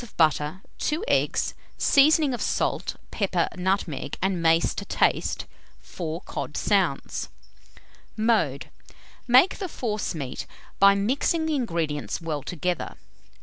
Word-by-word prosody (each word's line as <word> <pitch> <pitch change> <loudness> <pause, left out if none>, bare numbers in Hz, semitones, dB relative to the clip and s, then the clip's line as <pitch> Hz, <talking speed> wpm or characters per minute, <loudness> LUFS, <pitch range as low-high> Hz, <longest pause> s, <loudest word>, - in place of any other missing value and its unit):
of 240 - -13
butter, 155 +2 +2 0.2
2 320 +8 -1
eggs; - - +1 0.2
seasoning 295 0 +5
of 240 - -4
salt, - - -1 0.2
pepper, 185 -5 0
nutmeg, 180 -6 -1
and 190 -2 0
mace 165 0 +3
to - - -5
taste; - - 0 0.3
4 165 -1 -5
cod - - -5
sounds. - - 0 0.9
Mode. 210 - +1 0.6
Make 255 +10 +5
the 380 -3 -3
forcemeat 210 - -3 0.3
by 200 0 +7
mixing 270 +10 +1
the 315 - 0
ingredients 165 - -2
well 160 -4 -3
together. 175 +4 -3
190 Hz, 115 wpm, -25 LUFS, 165-245 Hz, 0.9 s, by